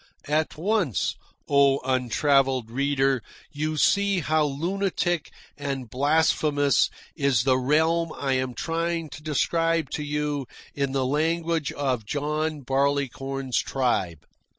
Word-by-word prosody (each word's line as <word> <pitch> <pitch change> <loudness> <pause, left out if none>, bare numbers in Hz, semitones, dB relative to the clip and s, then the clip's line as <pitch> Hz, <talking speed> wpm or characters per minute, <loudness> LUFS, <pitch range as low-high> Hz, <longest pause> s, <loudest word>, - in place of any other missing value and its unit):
At 155 +1 0
once, 180 - 0 0.3
O 140 -1 +4
untravelled 130 -1 +2
reader, 135 0 +1 0.3
you 155 +1 -2
see 200 +3 +3
how 155 0 +2
lunatic 175 +2 -1 0.3
and 135 -4 -4
blasphemous 145 0 +2 0.3
is 140 -7 +2
the 130 -1 +3
realm 160 +5 +2
I 135 -1 0
am 130 -1 -1
trying 165 +2 -2
to - - -9
describe 165 0 0
to 150 - -3
you 145 -2 -2 0.3
in 140 -1 -1
the 135 -1 +1
language 160 +2 0
of 130 -5 -1
John 150 +3 -2
Barleycorn's 135 -1 -1
tribe. 95 - -1
145 Hz, 115 wpm, -25 LUFS, 135-160 Hz, 0.3 s, O